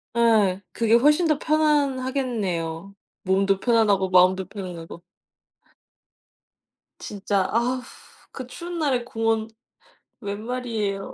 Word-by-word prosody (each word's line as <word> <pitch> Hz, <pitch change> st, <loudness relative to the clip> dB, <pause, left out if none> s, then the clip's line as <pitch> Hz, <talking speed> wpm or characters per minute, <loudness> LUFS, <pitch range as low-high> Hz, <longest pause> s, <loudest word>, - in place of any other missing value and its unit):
예. 215 Hz, -5 st, +3 dB
그게 230 Hz, -1 st, +1 dB
훨씬 300 Hz, +8 st, +4 dB
더 305 Hz, -1 st, +1 dB
편안하겠네요. 255 Hz, -, -1 dB, 0.3 s
몸도 195 Hz, +1 st, +2 dB
편안하고 210 Hz, -5 st, +2 dB
마음도 185 Hz, +1 st, +4 dB
편안하고. 175 Hz, -4 st, -8 dB, 1.9 s
진짜 200 Hz, -1 st, -2 dB
아 250 Hz, +3 st, 0 dB, 0.5 s
그 255 Hz, -2 st, -8 dB
추운 345 Hz, +5 st, -7 dB
날에 260 Hz, -6 st, +1 dB
공원 225 Hz, -2 st, -1 dB, 0.7 s
웬 205 Hz, 0 st, -5 dB
말이에요? 225 Hz, -6 st, -3 dB
225 Hz, 215 characters per minute, -24 LUFS, 195-255 Hz, 1.9 s, 훨씬